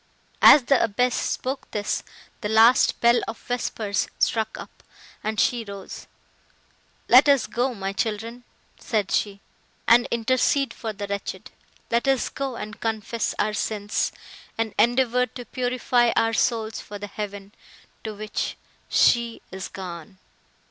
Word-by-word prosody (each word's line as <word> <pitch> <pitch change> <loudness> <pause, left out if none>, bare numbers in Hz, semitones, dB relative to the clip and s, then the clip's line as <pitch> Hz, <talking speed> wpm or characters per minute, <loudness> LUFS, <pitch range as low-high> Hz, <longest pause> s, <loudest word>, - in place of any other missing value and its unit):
As 290 - +9
the 270 +2 +3
abbess 235 +3 +1
spoke 260 +3 -3
this, 210 -1 -2 0.4
the 210 - -3
last 225 +3 +5
bell 235 +1 +5
of 225 - -5
vespers 225 -4 -2
struck 220 -1 0
up, - - -12 0.4
and 215 0 -2
she 240 -2 +2
rose. 200 -2 -9 1.0
"Let 260 +4 +7
us 280 -3 +4
go, 250 +1 -1
my 195 -1 -4
children," 225 +3 -3 0.4
said 210 -4 -1
she, 200 -1 -1 0.5
"and 240 +2 +6
intercede 255 +3 +1
for 225 - -5
the 205 -1 -6
wretched; 200 0 -5 0.4
let 235 +3 +1
us 270 -2 +2
go 275 -2 -4
and 215 -1 -7
confess 225 0 -2
our 215 - 0
sins, 210 -1 -1 0.5
and 225 -2 -1
endeavour 250 +1 +3
to 245 -1 -10
purify 245 -1 +1
our 225 0 +2
souls 225 -1 0
for 205 - -9
the 205 - -6
heaven, 205 -1 -7 0.5
to 220 -1 -5
which 215 +1 -4 0.3
she 235 -1 +2
is 190 0 -6
gone!" 180 -1 -9
225 Hz, 140 wpm, -24 LUFS, 210-245 Hz, 1.0 s, As